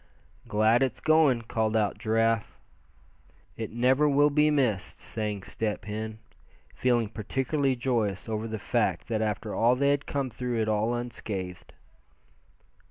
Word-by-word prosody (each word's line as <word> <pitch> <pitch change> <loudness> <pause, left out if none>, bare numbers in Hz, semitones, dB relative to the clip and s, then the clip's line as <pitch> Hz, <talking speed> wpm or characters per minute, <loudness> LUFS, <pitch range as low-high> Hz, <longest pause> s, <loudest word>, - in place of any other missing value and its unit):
"Glad 110 +3 +3
it's 130 -4 0
going!" 155 -6 +3
called 110 -1 0
out 105 -1 0
Giraffe. 115 0 0 1.0
"It 110 -2 -5
never 130 +6 +3
will 145 +1 +4
be 150 +1 +4
missed," 125 -10 0
sang 105 -3 -4
Step 105 0 -3
Hen, 110 +1 -5 0.6
feeling 120 -3 +1
particularly 135 +6 -1
joyous 115 -7 -1
over 110 0 -2
the 110 0 -4
fact - - -1
that 110 -2 0
after 105 0 -2
all 120 +2 +3
they 140 +2 +2
had 145 0 -1
come 135 -3 -2
through 120 0 -3
it 110 - 0
all 110 +2 +1
unscathed. 100 -7 -5
115 Hz, 140 wpm, -28 LUFS, 110-130 Hz, 1.0 s, will